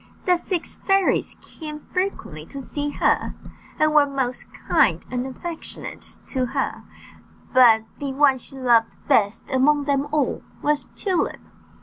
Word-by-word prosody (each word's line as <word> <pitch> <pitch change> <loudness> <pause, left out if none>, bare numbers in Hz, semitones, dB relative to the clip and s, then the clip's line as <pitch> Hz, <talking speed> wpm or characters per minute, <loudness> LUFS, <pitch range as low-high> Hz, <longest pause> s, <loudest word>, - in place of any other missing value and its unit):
The 360 - +5
six 350 -1 -2
fairies 390 -1 +1
came 305 -2 -9
frequently 365 - -2
to 275 - -8
see 290 +2 -3
her, - - +1 0.4
and 310 0 +3
were 295 -1 +6
most 265 -3 -3
kind - - +2
and 250 +1 -2
affectionate 325 +5 -6
to 260 -2 -2
her; - - -2 0.7
but 235 -4 +7 0.2
the 280 -1 -3
one 270 -1 +4
she 270 - -10
loved 240 -3 +3
best 210 +4 +2
among 285 +3 +3
them 280 0 0
all 300 -3 0 0.2
was 295 0 +1
Tulip. 375 -4 0
280 Hz, 135 wpm, -23 LUFS, 255-305 Hz, 0.7 s, but